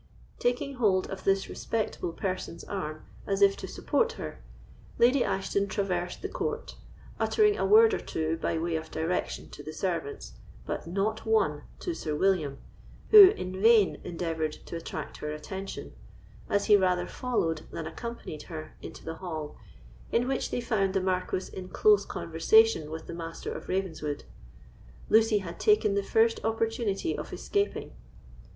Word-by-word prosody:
Taking 250 +3 -1
hold 195 -6 +2
of 190 -1 -7
this 195 0 +2
respectable 215 -6 -3
person's 185 -1 -4
arm 155 -6 -5 0.2
as 195 0 +2
if 195 0 +6
to - - -6
support 475 -1 0
her, - - -7 0.6
Lady 250 +2 +5
Ashton 195 +1 0
traversed 180 -3 -2
the - - -1
court, 460 +1 -4 0.4
uttering 420 -1 +3
a - - 0
word 445 +1 +7
or - - 0
two 160 0 -2
by 165 - -1
way 165 +1 -1
of 160 - -7
direction 165 +3 -2
to - - -9
the 155 - -7
servants, 155 - -3 0.3
but - - -4
not 200 +5 -1
one 175 -10 +2 0.2
to 350 - -2
Sir 155 - -3
William, 160 -5 +1 0.5
who 410 -3 +12
in 185 - -4
vain 220 -3 +5
endeavoured 165 -3 -2
to 170 - -9
attract 160 -2 -6
her 150 - -4
attention, 190 +6 -6 0.6
as 200 - +1
he 210 - +7
rather 180 -2 +2
followed 165 -11 -2
than 165 - -5
accompanied 235 -8 -6
her 155 -2 -7
into - - -10
the 165 0 -5
hall, 160 -5 -5 0.6
in 245 +2 +2
which 265 0 -1
they 245 - -2
found 200 -5 0
the - - +4
Marquis 185 0 -2
in 185 -1 -7
close 205 +1 +4
conversation 165 +1 +3
with 160 +1 -6
the - - -7
Master 165 -1 -6
of - - -8
Ravenswood. 160 -6 -2 0.9
Lucy 220 0 +5
had 185 -4 -6
taken 420 - +4
the 200 - +1
first 225 +3 +2
opportunity 225 - -1
of - - -6
escaping. 405 0 -2
190 Hz, 160 wpm, -29 LUFS, 165-225 Hz, 0.9 s, who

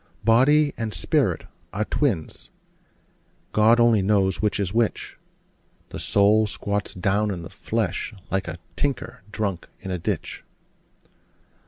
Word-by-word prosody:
Body 145 +6 +5
and 110 -2 -2
spirit - - +1 0.3
are 110 +2 -1
twins: 105 - -2 1.0
God 110 +2 +5
only 120 -3 +5
knows 95 -1 +2
which 105 0 0
is 95 -1 -1
which: 115 -1 0 0.7
The - - -7
soul 105 +2 +3
squats 100 0 -3
down 100 +3 +1
in 90 -4 -4
the 85 - -9
flesh, 110 -4 -2 0.2
like 95 -2 -1
a 85 0 -5 0.2
tinker 125 0 -2
drunk 100 -4 -3
in 95 - -6
a 90 - -2
ditch. - - -3
105 Hz, 130 wpm, -24 LUFS, 95-115 Hz, 1.0 s, Body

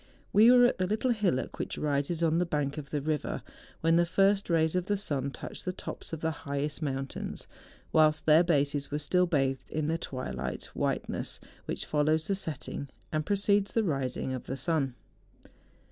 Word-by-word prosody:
We 220 +3 +7
were 245 0 +8
at 245 - +2
the 185 - +1
little 220 +5 +1
hillock 200 - 0
which - - -3
rises 150 +3 0
on 165 0 +3
the - - +3
bank 145 -2 -1
of 140 -2 -9
the 145 -2 -2
river, 155 -1 -2 0.4
when 165 +1 +4
the 175 - +4
first 195 +2 +3
rays 160 0 +2
of 180 0 0
the 205 - +1
sun 140 -9 -1
touched - - -8
the 185 - -1
tops 180 - -7
of 160 -1 -5
the 160 - +1
highest 145 +1 -3
mountains, 135 -2 -4 0.5
whilst 155 0 +4
their 160 +2 +7
bases 145 -4 +1
were 145 - -1
still 180 +5 +2
bathed 135 -5 0
in 155 0 -1
the 165 +1 0
twilight 130 -5 -5
white¬ - - 0
ness - - -4 0.3
which - - -3
follows 155 +1 +2
the 200 - +1
setting, 155 -6 -4 0.2
and 155 0 -1
precedes 200 0 +2
the 225 - +3
rising 135 -6 -1
of 130 - -5
the 135 - -4
sun. 135 -3 0
155 Hz, 190 wpm, -30 LUFS, 140-180 Hz, 0.5 s, were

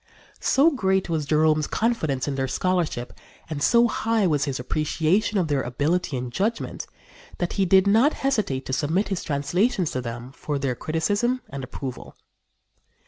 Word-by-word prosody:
So 295 +5 +4
great 190 - 0
was 155 -3 -1
Jerome's 155 0 +3
confidence 160 - 0
in 145 - -1
their 135 -1 -1
scholarship 170 -5 -1 0.3
and 150 -3 -5
so 235 +8 +5
high 225 -2 0
was 150 -5 +2
his 135 -3 -3
appreciation 160 - 0
of 180 -4 +1
their 145 -3 +1
ability 145 +5 -1
and 125 0 -4
judgment 220 +4 -2 0.5
that 175 - -2
he 195 - +1
did 190 +1 +5
not 225 +9 +4
hesitate 200 - 0
to 130 - -4
submit 160 +9 0
his 195 -3 -2
translations 175 - 0
to 130 - -2
them 120 +1 -6
for 145 +1 -4
their 135 -2 -1
criticism 205 - 0
and 135 0 -5
approval. 130 0 -7
160 Hz, 160 wpm, -24 LUFS, 140-200 Hz, 0.5 s, so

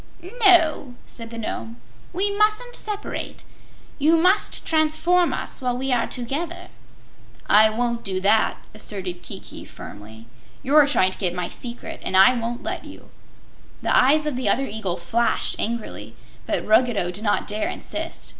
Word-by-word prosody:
"No," 325 - +4
said 230 -1 -8
the 230 - -8
Nome, 230 +1 -5 0.3
"we 400 +3 -1
mustn't 430 +4 +1
separate. 420 -1 -5 0.6
You 315 +4 +4
must 370 +5 +2
transform 320 +3 +2
us - - -4
while 250 -1 -1
we 265 +1 -2
are 245 -2 +2
together." 335 +9 -4 0.8
"I 215 +1 +6
won't 235 +1 -2
do 190 -2 -2
that," 205 +3 +3 0.2
asserted 190 -4 -4
Kiki, - - -10
firmly. 110 +2 -11 0.4
"You're 290 +2 +5
trying 185 -10 +2
to - - -7
get 180 -3 -1
my 180 -1 -3
secret, 240 -1 -6
and 190 - 0
I 195 +7 +8
won't 235 0 -4
let - - -4
you." - - -13 0.7
The - - +2
eyes 300 +4 +5
of 300 -3 -1
the 250 -5 0
other 270 +6 +2
eagle 205 -6 -4
flashed 225 +8 0
angrily, 230 0 -4 0.3
but - - -1
Ruggedo 220 -5 +3
did 200 +4 -8
not 205 - +1
dare 210 +1 -2
insist. - - -6
240 Hz, 155 wpm, -23 LUFS, 210-310 Hz, 0.8 s, I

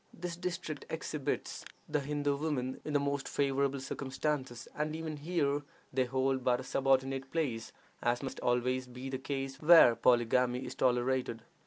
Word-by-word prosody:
This 175 0 -5
district 170 -4 -4
exhibits 155 -3 -3 0.2
the 150 0 +1
Hindoo 145 0 0
women 140 -4 -2
in 150 - -4
the 145 - +4
most 140 0 -1
favorable 140 0 +1
circumstances, 130 -2 -3
and 150 +1 -1
even 160 -1 -4
here 145 -2 0 0.3
they 130 0 +2
hold 130 +1 0
but 125 0 +3
a - - -5
subordinate 135 0 +1
place, 135 -9 -2 0.3
as 120 +2 +1
must 135 - -5
always 125 +1 +1
be 125 +2 -7
the 130 - -2
case 135 0 -3
where 160 -6 +8
polygamy 125 +1 +3
is - - -5
tolerated. 125 -2 +1
135 Hz, 155 wpm, -32 LUFS, 125-150 Hz, 0.3 s, where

